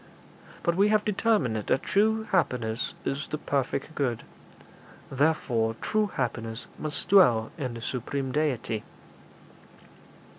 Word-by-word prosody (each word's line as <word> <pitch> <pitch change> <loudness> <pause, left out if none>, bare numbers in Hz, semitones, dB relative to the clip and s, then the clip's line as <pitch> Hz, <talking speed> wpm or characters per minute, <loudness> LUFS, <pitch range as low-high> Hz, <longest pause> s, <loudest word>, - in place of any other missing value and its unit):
But 170 - +2
we 200 +3 +4
have 210 0 +2
determined 210 - +2
that 110 +5 0
true 220 +2 +2
happiness 125 -10 0
is 140 +3 -2
the 150 - -3
perfect 140 +2 -2
good; 130 -7 -1 0.9
therefore 130 -6 +1
true 215 -1 +1
happiness 115 0 -3
must 155 -1 -3
dwell 120 - +5
in 130 -7 -4
the 115 - -7
supreme 130 +2 -3
Deity.' 125 -7 -1
140 Hz, 115 wpm, -27 LUFS, 115-185 Hz, 0.9 s, dwell